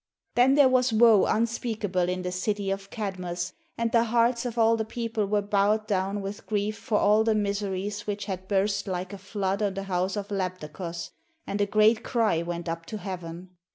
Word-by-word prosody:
Then 255 +3 +5
there 285 -2 +7
was 255 -1 +3
woe 220 -2 +6
unspeakable 220 -5 0
in 185 0 -2
the 180 - -2
city 195 +2 -1
of 195 0 -4
Kadmos 210 -3 -3
II 180 - -5
GREECE 175 +1 -3 0.2
and 230 0 0
the 230 0 +4
hearts 235 +1 +2
of 240 -1 -6
all 225 0 +5
the 220 - -1
people 225 -1 -2
were 205 0 +1
bowed 205 +1 +2
down 200 -1 -1
with 200 +2 -7
grief 210 0 -1
for 220 -1 -1
all 210 +2 +4
the 220 -1 +2
miseries 205 0 -2
which 205 -1 -3
had 190 -2 -5
burst 200 +1 0
like 185 0 -3
a 200 - -7
flood 195 0 -2
on 200 -2 0
the 195 - -3
house 185 0 -1
of 205 -1 -4
Labdakos 180 -3 -4 0.3
and 205 - -2
a 205 - +2
great 215 +2 +4
cry 220 -9 +1
went 170 0 -4
up 165 0 -4
to 215 - -5
heaven. 180 -2 -7
205 Hz, 205 wpm, -27 LUFS, 185-220 Hz, 0.3 s, there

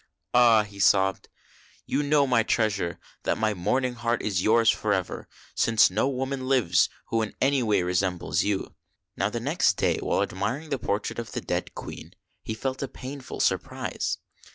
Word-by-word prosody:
"Ah!" 115 -3 +6
he 100 -1 -12
sobbed: 95 -1 +3 0.6
"you 140 - 0
know, 145 -1 +3
my 125 -3 +3
treasure, 100 -6 0 0.2
that - - 0
my 110 -1 +1
mourning 125 +8 0
heart 120 0 -1
is 95 -4 0
yours 115 +3 +3
forever, 100 -4 -2 0.3
since 115 -4 +4
no 110 +8 +1
woman 135 0 -3
lives 115 -11 +3 0.2
who 115 - +1
in 110 - -4
any 135 0 +2
way 105 -5 +2
resembles 90 0 0
you." 100 -2 -2 0.4
Now - - 0
the - - -3
next - - +1
day, - - +1
while - - +1
admiring 125 - -3
the 135 - 0
portrait 100 +3 -2
of 115 -2 -6
the - - -3
dead - - -3
Queen, - - -9 0.3
he 110 - -5
felt 130 +3 -3
a 140 - -2
painful 135 +1 -7
surprise. - - -1
115 Hz, 170 wpm, -26 LUFS, 100-130 Hz, 0.6 s, Ah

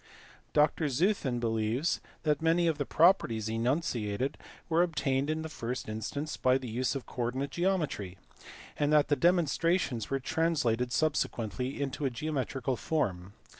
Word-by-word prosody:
Dr 150 +1 +3
Zeuthen 140 - +1
believes 115 +6 0 0.2
that 150 0 +1
many 165 +2 +3
of 160 -3 +1
the 145 - -1
properties 135 - +3
enunciated 120 -1 -1 0.3
were 165 0 +3
obtained 145 -5 0
in 155 0 -1
the - - -4
first 125 -4 -5
instance 110 +8 -4
by 130 0 +3
the 130 -1 -7
use 125 +4 -1
of 135 - -4
coordinate 130 +3 -3
geometry, 160 - -1 0.6
and 145 0 +2
that 150 -1 +4
the 145 - +4
demonstrations 165 - +1
were 135 - 0
translated 125 -6 0
subsequently 130 -4 -1
into 140 +1 -3
a - - +2
geometrical 135 -1 -2
form. 95 - -2
135 Hz, 140 wpm, -30 LUFS, 120-155 Hz, 0.6 s, that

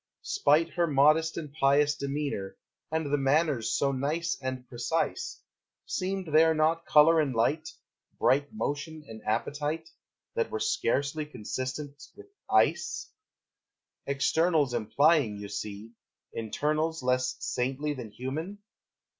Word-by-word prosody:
Spite 160 +4 +2
her 175 -1 +1
modest 155 +3 +3
and 150 -4 -6
pious 145 0 +3
demeanor, 140 -8 -3 0.3
And 160 0 0
the 145 - +3
manners 135 -3 +2
so 140 - +2
nice 155 +6 -1
and 130 -1 -4
precise, 165 - -2 0.4
Seemed 185 -3 -3
there 160 +1 +6
not 160 +2 +1
color 160 +2 +6
and 140 -5 0
light, 155 +8 +1 0.5
Bright 140 +2 +2
motion 155 -5 -4
and 110 -1 -9
appetite, 145 +8 -1 0.5
That 470 -1 0
were 440 - -3
scarcely 155 - 0
consistent 130 +3 -5
with 410 - -13 0.2
ice? 445 -1 +1 1.0
Externals 145 0 +2
implying, 120 +1 +3
you 100 0 -7
see, 105 +2 -6 0.4
Internals 155 +7 -1
less 125 0 +1
saintly 135 +4 -2
than 125 -5 -7
human? 140 - -5
145 Hz, 120 wpm, -29 LUFS, 130-160 Hz, 1.0 s, there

